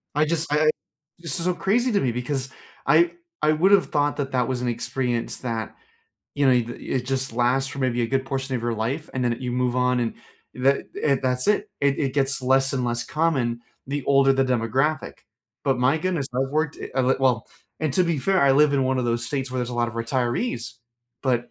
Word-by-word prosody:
I 150 +1 +3
just 160 -1 -2
I 150 +1 +3
I 155 - +5 0.5
this 165 -2 -3
is 165 - -2
so 180 - +2
crazy 235 +8 +1
to 200 - +3
me 125 - +1
because 130 +2 -3 0.4
I 170 +2 +5 0.3
I 150 - +4
would 170 +6 +3
have 195 -2 +5
thought 145 -1 +1
that 140 -1 -3
that 125 -2 +1
was 125 -1 -2
an 125 - -1
experience 120 0 -2
that, 115 -3 -4 0.6
you 140 -1 +2
know, 130 - +6
it 120 -2 +2
uh, - - -6
it 125 -2 -3
just 135 -2 -2
lasts 125 +3 +1
for 140 - -8
maybe 120 -2 +1
a - - +1
good 135 +2 0
portion 135 -1 -3
of 120 - -2
your 120 -1 -1
life, 130 +9 -3
and 125 -1 -1
then 120 -1 +1
you 125 -1 -3
move 125 0 0
on 125 0 +2
and 115 - -1 0.4
that 135 +2 +1 0.2
and 140 -3 +2
that's 125 0 0
it; 210 0 +1
it 140 -1 +2
it 135 -3 -1
gets 135 -1 +1
less 135 +1 +3
and 130 -2 -1
less 120 0 -1
common 130 -8 0 0.3
the 140 0 -3
older 135 -1 +4
the 135 0 +2
demographic. 130 +5 0 0.5
But 135 -3 +1
my 130 +5 +3
goodness, 165 -4 -1
I've 135 +1 0
worked 155 0 0
it - - -7
of 130 -1 +2
it 135 - +1
well 125 -4 +2 0.3
And 155 -4 0
to 185 - +4
be 170 -3 0
fair, 190 +6 +2
I 135 -1 +5
live 145 +1 +5
in 135 -1 +2
one 130 0 +1
of 125 - 0
those 120 0 -1
states 135 -1 -3
where 130 - -3
there's 125 - -2
a - - -5
lot 120 0 +1
of 115 - -9
retirees, 120 - -2 0.5
but, 120 -3 0
130 Hz, 235 wpm, -24 LUFS, 125-145 Hz, 0.6 s, know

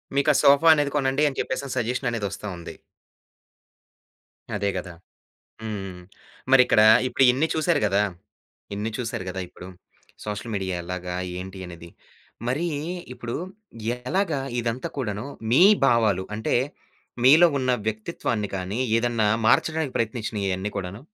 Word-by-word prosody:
మీకా 140 +2 +4
sofa 140 +4 +5
అనేది 145 -2 +1
కొనండి 135 +1 +1
అని 135 - -10
జెప్పేసని 130 0 -3
సజెషన్ 125 +2 -1
అనేది 115 -3 -2
వస్తా 105 - -7
ఉంది. 85 - -9 1.8
అదే 100 -1 0
గదా! 90 0 -5 0.7
హ్మ్. 110 -1 -4
హ్మ్. 90 -2 -8 0.5
మరిక్కడ 125 -4 +6 0.3
ఇప్పుడు 135 - +2
ఇన్ని 140 +6 +1
చూసారు 160 0 +1
గదా! 100 +1 +2 0.7
ఇన్ని 105 +2 -3
చూసారు 115 -6 -3
గదా! 95 +1 -4
ఇప్పుడు 90 - -12 0.6
సోషల్ 105 +2 -5
మీడియా 95 -2 -2
ఎలాగా? 90 0 -5 0.2
ఏంటి 95 +1 -8
అనేది? 85 -1 -10 0.6
మరీ 145 +8 0 0.5
ఇప్పుడు 120 -1 -6 0.6
ఎలాగా 145 +5 -1 0.2
ఇదంతా 120 +2 -3
కూడాను 105 -3 -3 0.2
మీ 130 +9 +6 0.2
భావాలు 110 -7 +2
అంటే, 110 - -1 0.7
మీలో 155 +7 +8
ఉన్న 130 -1 0 0.2
వ్యక్తిత్వాన్ని 110 -1 -2
కానీ, 95 +4 -4 0.2
ఏదన్నా 115 -3 +1 0.2
మార్చడానికి 160 +3 +2
ప్రయత్నించినయి 110 -3 -2
ఈ - - +1
అన్నీ 100 +2 -4
కూడాను? 95 +2 -5
115 Hz, 130 wpm, -24 LUFS, 100-135 Hz, 1.8 s, మీలో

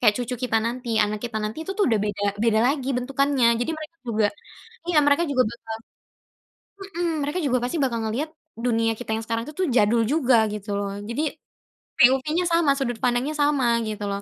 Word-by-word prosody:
kayak 215 -5 +5
cucu 250 0 -3
kita 225 - +2
nanti, 245 +1 -4 0.2
anak 210 +1 -3
kita 235 -2 -4
nanti 215 +6 -4
itu - - -1
tuh 410 - +4
udah 225 -3 +2
beda 205 -1 -3 0.2
beda 220 -2 +3
lagi 270 -1 0
bentukannya. 270 0 +1
Jadi, 245 - -1
mereka 310 +1 -9
juga 215 -2 +2 0.6
iya, 340 -3 +3
mereka 285 +3 +4
juga 255 -2 +3
bakal 230 -1 -8 1.3
mhm, 350 - +1 0.2
mereka 295 +6 -2
juga 255 -2 +2
pasti 250 +7 -2
bakal 240 -3 0
ngelihat 250 +9 -2 0.4
dunia 225 -2 +2
kita 245 - -8
yang 225 - -4
sekarang 230 0 -2
itu 305 +5 -3
jadul 230 0 +4
juga 265 -5 +3 0.2
gitu 210 0 -7
loh. 200 -1 -3 0.2
Jadi, 235 +6 -1 0.8
POV-nya 270 +8 +4
sama, 335 -4 +3
sudut 245 -3 -1
pandangnya 250 +5 +1
sama 290 -3 +2 0.2
gitu 210 -1 -4
loh. 200 0 -3
245 Hz, 185 wpm, -24 LUFS, 225-285 Hz, 1.3 s, kayak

